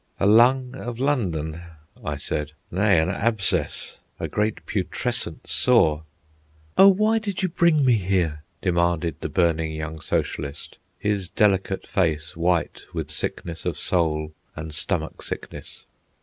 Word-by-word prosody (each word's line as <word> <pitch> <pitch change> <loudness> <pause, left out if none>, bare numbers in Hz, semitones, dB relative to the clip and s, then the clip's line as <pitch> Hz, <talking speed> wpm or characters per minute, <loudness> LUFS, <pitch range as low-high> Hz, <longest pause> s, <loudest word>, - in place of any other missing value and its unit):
"A - - +2
lung 125 +4 +5
of 120 -2 -6
London," 85 - -1 0.4
I 75 - -2
said; 75 +1 -3 0.2
"nay, 95 +1 +3
an 80 +3 +2
abscess, 110 -2 0 0.2
a - - -2
great 105 +1 -1
putrescent - - -2
sore." 80 -12 +3 0.7
"Oh, 195 - +8
why 215 +3 +4
did 200 -4 -4
you 185 - +2
bring 165 -4 +3
me 125 -3 +5
here?" 90 -5 0 0.2
demanded 85 -2 +1
the - - -4
burning 80 -3 +1
young 80 0 -5
socialist, 70 -1 -3 0.2
his 100 -3 -1
delicate 95 -2 +1
face 80 -5 0
white 85 -1 0
with - - -2
sickness 85 -1 -3
of - - -2
soul 80 -3 0 0.2
and 80 0 -6
stomach 80 +1 -2
sickness. - - -6
90 Hz, 135 wpm, -24 LUFS, 80-115 Hz, 0.7 s, Oh